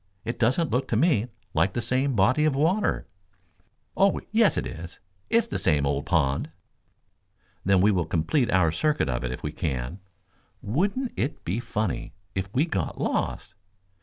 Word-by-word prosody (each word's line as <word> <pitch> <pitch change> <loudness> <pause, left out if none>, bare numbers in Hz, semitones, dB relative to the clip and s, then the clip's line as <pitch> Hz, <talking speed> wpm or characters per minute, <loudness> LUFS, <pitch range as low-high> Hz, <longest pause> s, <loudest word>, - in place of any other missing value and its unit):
It 115 +1 -4
doesn't 130 +8 +2
look 130 +2 0
to - - -1
me 135 - +3 0.3
like 95 - +2
the - - -1
same 130 +1 +1
body 125 +9 +3
of 155 -3 +2
water." 170 +9 +1 0.9
"Oh, 195 0 +3
yes 220 -2 +4
it - - -1
is. 85 0 -8 0.3
It's 230 -1 +3
the 230 - -3
same 75 -3 +2
old 70 0 -1
pond." 70 -6 +1 1.1
"Then 95 -1 +4
we 105 +3 +5
will 90 -4 +1
complete 90 - +1
our 90 -4 +3
circuit 150 - +1
of - - -1
it 65 - -2
if 65 - -6
we 75 - -2
can. 70 +2 -3 0.6
Wouldn't 200 - 0
it 140 - -3
be 95 +7 -1
funny 110 -8 -3 0.2
if 95 +1 -3
we 140 +8 +2
got 95 - -3
lost?" - - -2
110 Hz, 165 wpm, -26 LUFS, -, 1.1 s, we